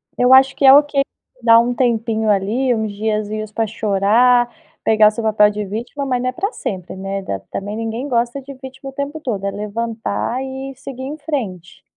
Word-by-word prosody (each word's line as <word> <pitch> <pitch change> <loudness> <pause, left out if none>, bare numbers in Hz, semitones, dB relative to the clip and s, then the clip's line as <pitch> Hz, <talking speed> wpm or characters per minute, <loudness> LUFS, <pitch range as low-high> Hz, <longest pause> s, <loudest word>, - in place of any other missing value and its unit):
Eu 250 +1 +4
acho 265 +1 +6
que - - -4
é 265 - +10
ok 290 0 +4 0.4
dá 230 0 +7
um 240 +1 +1
tempinho 225 -3 0
ali, 215 +6 +1
uns 220 -2 -2
diazinhos 215 0 -2
pra 225 0 -1
chorar, 225 +4 +3 0.3
pegar 220 -1 +5
o - - +4
seu 225 +2 -5
papel 210 -1 +4
de 210 0 -4
vítima, 235 +8 -5
mas 250 -2 0
não 255 - 0
é - - -2
pra 400 - -3
sempre, 185 - -5
né, 195 +1 -4
da 100 - -4
também 205 +2 -4
ninguém 225 +4 -3
gosta 240 +2 0
de 275 +1 -10
vítima 265 +1 -9
o - - -11
tempo 280 +3 -4
todo, 210 -9 -3
é 200 - -1
levantar 225 +3 -3
e 265 0 -6
seguir 260 0 -8
em 280 +3 -5
frente. 225 - -5
230 Hz, 200 wpm, -19 LUFS, 210-265 Hz, 0.4 s, é